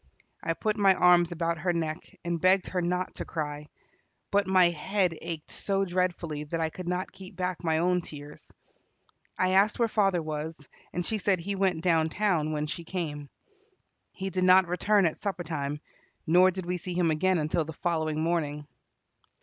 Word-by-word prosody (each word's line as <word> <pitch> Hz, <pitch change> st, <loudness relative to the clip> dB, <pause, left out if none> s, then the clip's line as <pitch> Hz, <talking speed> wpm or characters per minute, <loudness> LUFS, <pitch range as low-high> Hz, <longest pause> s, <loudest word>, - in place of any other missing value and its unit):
I 165 Hz, -, -1 dB
put 215 Hz, +4 st, -1 dB
my 195 Hz, -2 st, +5 dB
arms 175 Hz, -1 st, +5 dB
about 170 Hz, -1 st, -1 dB
her 175 Hz, +2 st, 0 dB
neck, 165 Hz, +3 st, -4 dB
and 170 Hz, -1 st, -2 dB
begged 185 Hz, +1 st, +3 dB
her 180 Hz, -, -1 dB
not 180 Hz, +1 st, -1 dB
to -, -, -3 dB
cry, 150 Hz, -2 st, -5 dB, 0.6 s
but 200 Hz, 0 st, +2 dB
my 185 Hz, -2 st, +5 dB
head 180 Hz, +2 st, 0 dB
ached 165 Hz, -2 st, -6 dB
so 195 Hz, -1 st, 0 dB
dreadfully 175 Hz, -4 st, -1 dB
that 165 Hz, +3 st, -3 dB
I 160 Hz, -1 st, 0 dB
could 180 Hz, +1 st, -8 dB
not 180 Hz, +1 st, -2 dB
keep 185 Hz, -1 st, -12 dB
back 180 Hz, -1 st, -3 dB
my 160 Hz, -1 st, +1 dB
own 180 Hz, +2 st, +2 dB
tears. 150 Hz, -2 st, -11 dB, 0.9 s
I 185 Hz, -, +2 dB
asked 195 Hz, +3 st, +3 dB
where 235 Hz, -, +2 dB
father 195 Hz, -5 st, +2 dB
was, 155 Hz, +1 st, -4 dB, 0.3 s
and 175 Hz, 0 st, -3 dB
she 220 Hz, -, -1 dB
said 195 Hz, -1 st, +2 dB
he 200 Hz, +4 st, -3 dB
went 190 Hz, -4 st, 0 dB
down 165 Hz, -3 st, +3 dB
town 170 Hz, -5 st, 0 dB
when 150 Hz, -1 st, -1 dB
she 170 Hz, +2 st, -5 dB
came. 155 Hz, -5 st, -4 dB, 0.8 s
He 190 Hz, 0 st, -5 dB
did 185 Hz, 0 st, 0 dB
not 185 Hz, 0 st, +6 dB
return 195 Hz, +3 st, +2 dB
at 165 Hz, -, -1 dB
supper 195 Hz, -3 st, -3 dB
time, 150 Hz, -3 st, -3 dB, 0.5 s
nor 180 Hz, +3 st, +6 dB
did 185 Hz, -1 st, -5 dB
we 180 Hz, +1 st, -1 dB
see 180 Hz, +1 st, -6 dB
him 175 Hz, -2 st, +2 dB
again 185 Hz, +4 st, +2 dB
until 155 Hz, +1 st, 0 dB
the 160 Hz, +1 st, -8 dB
following 160 Hz, -2 st, -1 dB
morning. 150 Hz, -3 st, -1 dB
175 Hz, 185 wpm, -28 LUFS, 160-185 Hz, 0.9 s, not